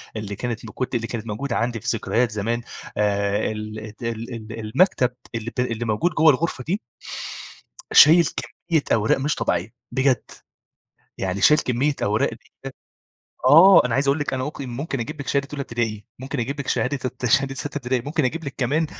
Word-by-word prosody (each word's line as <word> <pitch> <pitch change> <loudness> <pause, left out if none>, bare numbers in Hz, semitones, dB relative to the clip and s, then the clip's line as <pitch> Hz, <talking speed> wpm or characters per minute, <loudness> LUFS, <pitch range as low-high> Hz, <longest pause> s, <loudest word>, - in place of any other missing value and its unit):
اللي 105 -2 -4
كانت 120 0 -4
ب - - -7
كنت 130 +5 -4
اللي 115 -1 -1
كانت 115 -1 -5
موجودة 115 +4 -3
عندي 115 0 -1
في 115 - -10
ذكريات 115 +2 0
زمان 115 +3 -1 0.4
آآ، 100 0 +1
ال 110 0 -6
ال 110 0 -9
ال 115 +1 -4 0.2
ال 115 - -6
المكتب 125 - +2 0.2
اللي 115 0 -4
ب - - -2
اللي 120 -2 -1
موجود 115 +11 +1
جوا 160 -2 +6
الغرفة 145 -1 -2
دي 180 - -1 1.1
شايل 165 +2 +8
كمية 155 +6 -2
أوراق 110 0 +3
مش 140 +2 0
طبيعية، 95 +7 -1 0.2
بجد. 130 -2 +1 0.9
يعني 95 0 -2
شايل 150 +9 +6
كمية 130 +4 0
أوراق 105 +2 +2
كده - - -10 1.1
آه، 165 +8 +8
أنا 125 -2 0
عايز 135 +1 +1
أقول 140 +3 +3
لِك 145 -3 -2
أنا 130 0 -2
ممكن 140 -2 -6
ممكن 135 +2 -4
أجيب 115 +5 -5
لك 140 - -6
شهادة 140 0 0
أولى 145 -1 -3
ابتدائي، 115 -5 -3
ممكن 130 +1 -4
أجيب 140 +5 -3
لك 140 - -6
شهادة 140 +2 0
الت 130 0 -3
شهادة 135 +3 +2
ستّة 145 +3 -5
ابتدائي، 125 -2 -1
ممكن 150 +3 -1
أجيب 160 +6 -2
لك 140 - -5
كمان 145 +5 +1
125 Hz, 190 wpm, -23 LUFS, 110-140 Hz, 1.1 s, شايل